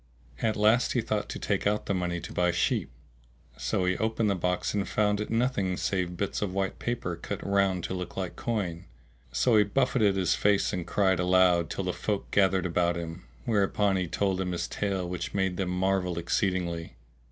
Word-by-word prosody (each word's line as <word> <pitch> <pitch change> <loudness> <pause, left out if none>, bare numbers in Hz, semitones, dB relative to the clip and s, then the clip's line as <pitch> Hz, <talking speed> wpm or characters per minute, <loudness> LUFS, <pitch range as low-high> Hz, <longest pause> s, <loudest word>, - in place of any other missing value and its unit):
At 110 -1 +1
last 110 +3 +3
he 120 - +2
thought 110 -2 -2
to - - -4
take 100 -1 0
out 105 +1 0
the - - 0
money 90 -2 -1
to - - -8
buy 90 0 +2
sheep; 85 0 0 0.7
so 90 - -1
he 90 0 +2
opened 110 -1 +1
the - - +1
box 90 0 -1
and 100 -2 -1
found 105 -1 +1
in 105 - -3
it - - -18
nothing, 115 -6 +1
save 90 -2 -1
bits 100 - -2
of 100 -3 -1
white 95 -1 -1
paper 120 -8 -2
cut 85 - -6
round 100 -3 +2
to - - -3
look 90 -1 -5
like 95 -2 -3
coin;[FN#656] 95 -8 -3 0.5
so 110 - +3
he 105 - +6
buffeted 105 -1 +2
his 90 -3 +2
face 100 0 +2
and 90 -3 -3
cried 95 -1 +2
aloud 90 -2 +4
till 95 - -3
the 90 -1 -1
folk 105 -2 -3
gathered 95 -2 +3
about 85 0 +1
him, 85 +1 -6 0.2
whereupon 100 -2 +2
he 90 -2 0
told 95 +2 0
them 90 -1 -1
his 85 - -2
tale 95 -3 -2
which 90 +2 -4
made 95 -2 0
them 95 -2 -1
marvel 90 -1 0
exceedingly. 85 -3 -1
95 Hz, 200 wpm, -28 LUFS, 90-105 Hz, 0.7 s, he